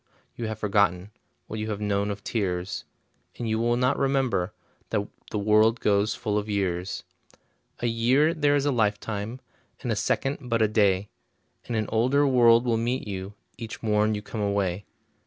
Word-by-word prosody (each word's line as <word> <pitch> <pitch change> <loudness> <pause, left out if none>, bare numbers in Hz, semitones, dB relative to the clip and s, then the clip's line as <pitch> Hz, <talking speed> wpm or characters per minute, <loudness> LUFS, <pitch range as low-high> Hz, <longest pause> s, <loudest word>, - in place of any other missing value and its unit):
you 115 - -4
have 110 -1 -4
forgotten 100 -2 +1 0.3
What 110 - -6
you 110 +1 -3
have 105 -2 -3
known 100 -1 0
of 100 -1 -5
tears, 95 -4 -2 0.5
And 120 - -3
you 110 0 0
will 120 +1 +2
not 125 +1 +1
remember 135 -9 +1 0.4
That - - -1 0.2
the - - -3
world 110 +3 +4
goes 105 +1 +2
full 105 -1 -1
of 105 +1 -6
years. 95 -3 -2 0.8
A - - -1
year 125 +7 +3
there 145 -3 +2
is 140 -1 +1
a 145 - +2
lifetime, 110 +1 -1 0.4
And - - -2
a - - +1
second 135 -2 -1
but 115 -1 +2
a 110 - +4
day, 100 -2 +2 0.6
And 120 - -2
an 110 -1 0
older 130 +6 +3
world 120 -3 +5
will 115 -2 +2
meet 120 +2 -1
you 95 0 -5 0.2
Each 115 0 -7
morn 105 0 +2
you 105 - -5
come 110 - -5
away. 100 -2 -1
110 Hz, 175 wpm, -26 LUFS, 100-120 Hz, 0.8 s, world